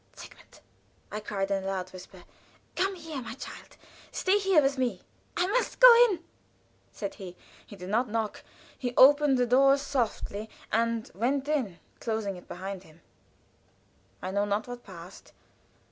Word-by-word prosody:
"Sigmund!" - - -14 0.5
I 210 - -3
cried, 200 -2 -3
in 195 -1 0
a - - -4
loud 185 -1 -3
whisper. 185 0 -12 0.5
"Come 385 +1 0
here, 320 -5 -6
my 235 - -7
child! - - -10 0.3
Stay 385 +2 +2
here, 385 -4 +4
with 275 -1 +1
me." 240 -8 -1 0.3
"I 355 - +3
must 480 +6 -1
go - - +11 0.2
in," 350 -5 -3 0.7
said 200 -2 -5
he. 180 -2 -8 0.3
He - - -11
did 180 -1 -8
not 235 +4 +1
knock. 220 -1 -2 0.3
He 245 -2 -4
opened 285 0 +7
the 250 - +3
door 270 +3 +5
softly, 235 -6 -2 0.2
and 230 0 0
went 260 +8 0
in, 255 - -1 0.2
closing 220 -4 -2
it 180 - -14
after 190 +2 -5
him. 160 +1 -20 1.2
I 185 - -3
know 200 +1 +1
not 205 +2 -1
what 245 0 -8
passed. 180 -1 -12
230 Hz, 160 wpm, -28 LUFS, 195-280 Hz, 1.2 s, go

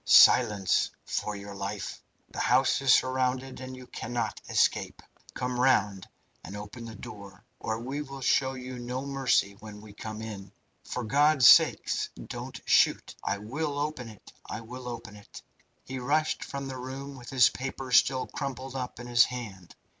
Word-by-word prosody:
"Silence, 105 -7 +6 0.2
for 105 - -2
your 100 0 -8
life! 100 +1 -5 0.3
The - - -6
house - - +3
is 135 -1 +4
surrounded, 130 0 +1
and 130 0 -7
you 130 - -10
cannot 120 -2 -4
escape. - - +1 0.4
Come 125 0 -2
round 105 -7 +2 0.3
and 100 - -7
open 105 +3 -8
the 110 -1 -8
door, 100 -2 -11
or 110 0 -3
we 135 +5 -4
will 135 -2 -8
show 130 +1 +2
you 130 -1 -7
no 125 +2 -4
mercy 135 -7 +2
when 105 -1 -10
we 105 -1 -13
come 110 +1 -7
in." 100 -3 -8 0.3
"For 125 - -4
God's 140 +2 +5
sake, - - +7 0.3
don't - - -7
shoot! - - +3
I 100 - -1
will 140 +8 -3
open 145 -5 -3
it! 110 - -15
I 110 - -6
will 125 +2 -9
open 115 -3 -7
it!" 105 -1 -13 0.4
He 130 0 -6
rushed 155 +5 0
from 140 0 -5
the 130 -1 -6
room 135 +2 -7
with 120 -2 -11
his 125 -3 +5
paper 135 0 -6
still 130 +1 +4
crumpled 135 -1 -5
up 125 -3 -5
in 120 - -7
his 120 -1 +5
hand. 105 -8 -8
125 Hz, 170 wpm, -28 LUFS, 105-130 Hz, 0.4 s, sake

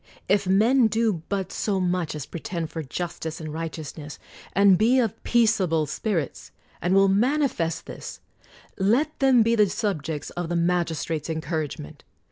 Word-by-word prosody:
If 200 0 +2
men 225 +6 +4
do 220 -5 0
but 195 -3 -2
so 200 -3 -1
much 180 -3 -1
as 150 -3 -5
pretend 170 0 -5
for 165 - -4
justice 160 +2 -5
and 155 -2 -6
right 165 0 -3
eousness, 150 -1 -8 0.4
and 200 -1 +6
be 230 +7 +3
of 225 -5 -1
peaceable 195 -9 +2
spirits, 165 - -3 0.3
and 180 +2 +1
will 195 0 +6
manifest 200 - +1
this, - - -8 0.6
let 250 +11 +1
them 260 -4 +5
be 230 +1 +2
the 210 -3 +4
subjects 160 -9 -3
of 175 -1 -4
the 175 - -1
magistrate's 170 -2 -1
encouragement. 155 - -4
180 Hz, 150 wpm, -25 LUFS, 160-215 Hz, 0.6 s, and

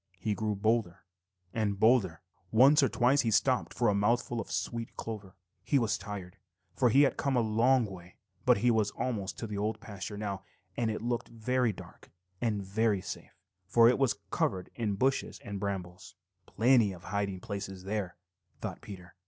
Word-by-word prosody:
He 105 +3 -1
grew 105 0 -1
bolder 110 -4 0 0.5
and 105 -3 -1
bolder. 105 -9 +3 0.3
Once 135 +7 +6
or 135 - +3
twice 130 +3 +3
he 115 - 0
stopped 125 +4 +2
for 120 -1 0
a 105 - +4
mouthful 115 +3 +1
of 100 - -9
sweet 115 +4 -3
clover. 105 -4 -6 0.3
He 145 - +2
was 115 -5 +1
tired, 100 -2 -7 0.4
for 125 - +3
he 135 +6 +6
had 140 - +2
come 140 -1 0
a 120 - +4
long 115 +3 +3
way, 90 -3 -10 0.3
but - - +5
he 120 +4 +3
was 110 -2 +2
almost 100 -7 -2
to - - -4
the 105 -2 -4
Old 110 +1 -1
Pasture 105 -2 -7
now, 100 -2 -3 0.3
and 115 -2 0
it 110 0 -3
looked 120 0 -1
very 120 +1 0
dark 100 - -13 0.3
and 105 -4 -1
safe, 100 -1 -2 0.3
for 115 +4 +6
it 125 - +3
was 135 -3 +2
covered 90 -1 -1
with 105 -4 -1
bushes 135 +5 0
and 100 -1 -5
brambles. 95 -3 -5 0.3
"Plenty 115 -4 +3
of 85 -1 -12
hiding 100 -2 -2
places 95 -1 -6
there," 95 -3 -3 0.4
thought - - -5
Peter. 90 -3 -10
110 Hz, 175 wpm, -30 LUFS, 100-120 Hz, 0.5 s, Once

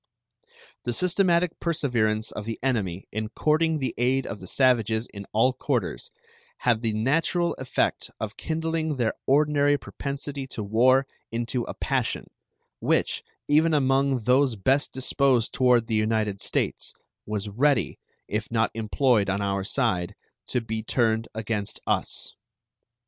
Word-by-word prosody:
The 120 - -2
systematic 180 - +2
perseverance 120 -10 0
of 105 - -6
the 115 0 -4
enemy 100 -9 -1
in 110 0 -3
courting 155 +5 +2
the 135 -3 -2
aid 130 +2 +2
of 100 - -5
the 95 - -9
savages 115 -3 +2
in 100 -1 -8
all 125 +4 +3
quarters 125 -6 -2 0.5
had 120 -3 +2
the 115 -2 0
natural 165 +9 +1
effect 130 -1 -1
of 110 -1 -4
kindling 160 -1 -2
their 120 -4 0
ordinary 145 0 +4
propensity 140 0 -5
to 110 - -5
war 125 +6 +4 0.3
into 120 +1 -2
a - - -6
passion, - - -1 0.5
which, - - +1 0.3
even 155 +2 +4
among 135 -2 +2
those 130 +1 +3
best 130 +8 +1
disposed 130 -2 +1
toward 125 -2 +4
the 115 - -4
United 110 -2 0
States, - - -2 0.3
was 105 -1 -2
ready, 135 +7 +1 0.3
if 105 +2 -3
not 115 -1 +1
employed 110 -1 +2
on 100 +1 0
our 100 -1 -1
side, 100 -5 0 0.3
to 125 - 0
be 110 -1 -3
turned 115 0 +1
against 105 -2 -3
us. - - -1
125 Hz, 140 wpm, -26 LUFS, 110-140 Hz, 0.5 s, ordinary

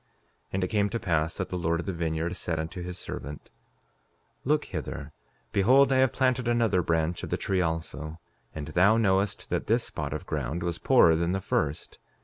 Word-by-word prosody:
5:23 - - -44
And 95 0 0
it - - +1
came 105 -2 +1
to 115 - -2
pass 85 -5 0
that - - -3
the 90 - -3
Lord 85 0 0
of 85 - -4
the 95 - -2
vineyard 85 +1 -2
said 85 -2 -2
unto 80 +3 -5
his 90 0 -6
servant: 75 -4 -7 0.9
Look 150 +2 +1
hither; 80 -3 -6 0.4
behold 130 +7 +5
I - - +3
have 130 -1 +4
planted 130 -2 +1
another 115 -6 +2
branch 85 0 0
of - - -6
the - - 0
tree 95 -1 0
also; 80 -1 -3 0.4
and 75 -2 -5
thou 100 +5 +4
knowest 100 -2 +1
that - - -1
this - - +3
spot - - -5
of - - -4
ground 75 +4 -3
was 85 -1 -2
poorer 80 - +5
than 85 +2 0
the 95 - 0
first. 75 -5 -2
90 Hz, 200 wpm, -28 LUFS, 80-100 Hz, 0.9 s, behold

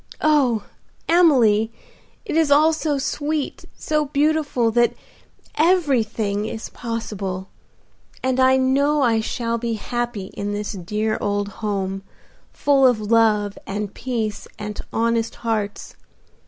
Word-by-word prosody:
Oh! 270 -8 +3 0.4
Emily, 245 -11 +4 0.5
it - - -3
is 320 -2 +3
all 305 +3 +5
so 310 -2 -1
sweet, 290 +2 -2
so 305 -1 0
beautiful, 290 -4 +1
that 240 +1 +2 0.6
everything 235 - +1
is 220 - -6
possible, 205 -5 -5 0.7
and 260 0 +1
I 260 0 +5
know 280 +3 +2
I 230 -3 +3
shall 230 +1 -2
be 235 0 -2
happy 240 -3 -4
in 205 0 -3
this 205 0 -3
dear 210 +4 -2
old 205 0 -1
home, 195 -2 -2 0.5
full 275 -2 +4
of 245 -3 +2
love 210 -2 +2
and 205 0 -4
peace 230 -4 -3
and 210 0 -5
honest 230 0 0
hearts. 215 -3 -3
230 Hz, 120 wpm, -22 LUFS, 210-280 Hz, 0.7 s, all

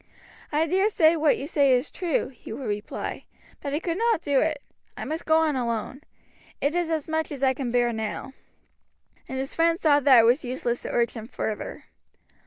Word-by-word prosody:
"I 305 +2 +2
dare 380 +6 +2
say 330 -5 +4
what 310 -2 +3
you 275 - -5
say 285 -3 +3
is 250 +3 0
true," 345 -5 -1
he 255 - -12
would 255 +4 -6
reply; 205 0 -4 0.4
"but 280 - -4
I 295 - 0
could 335 +2 -3
not 460 -6 +2
do 285 -2 +2
it 305 -3 -1 0.3
I - - -5
must 315 +2 -4
go 315 0 +5
on 315 -3 +2
alone. 235 +2 -3 0.6
It 285 +2 0
is 350 -1 0
as 315 -3 -1
much 320 0 -1
as 275 -2 -5
I 265 -1 +4
can 260 -2 -4
bear 240 -1 +2
now." 220 +4 -4 0.9
And 265 - -5
his 265 +1 -4
friends 335 +2 +2
saw 290 -2 +5
that 265 -3 +6
it - - +3
was 245 +5 +3
useless 245 -1 -2
to - - -6
urge 235 -1 +1
him 225 -2 -8
further. 220 -4 -5
285 Hz, 205 wpm, -25 LUFS, 245-320 Hz, 0.9 s, that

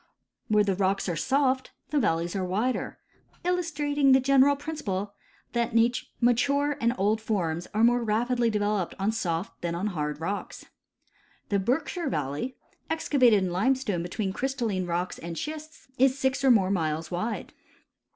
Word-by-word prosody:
Where 210 -1 +4
the 200 -1 +1
rocks 195 +1 0
are 175 - -1
soft, 260 - +1 0.2
the 300 - +2
valleys 170 -6 0
are 190 - -1
wider; 210 +8 -1 0.5
illustrating 295 -6 +2
the 265 - +6
general 275 +1 +4
principle 210 -10 -4 0.4
that 235 -1 0 0.4
mature 280 +4 +2
and 235 +1 +2
old 210 +3 +1
forms 175 -7 -1
are 215 +2 +1
more 240 +1 +4
rapidly 235 +2 +1
developed 205 -3 -1
on 195 +3 +1
soft 180 -2 -3
than 170 -1 -2
on 180 +4 -2
hard 150 -2 -3
rocks. 195 +5 -4 0.8
The 200 - +2
Berkshire 305 - -1
valley, 150 - -3 0.3
excavated 255 -10 +3
in 185 - -1
limestone 210 -1 +1
between 190 +3 -3
crystalline 230 -8 -2
rocks 175 +1 -2
and 170 0 -6
schists, 310 +1 -7
is 265 +1 +4
six 265 0 0
or 270 - +5
more 200 -6 +4
miles 160 -3 -1
wide. 215 +6 -3
220 Hz, 150 wpm, -27 LUFS, 185-265 Hz, 0.8 s, the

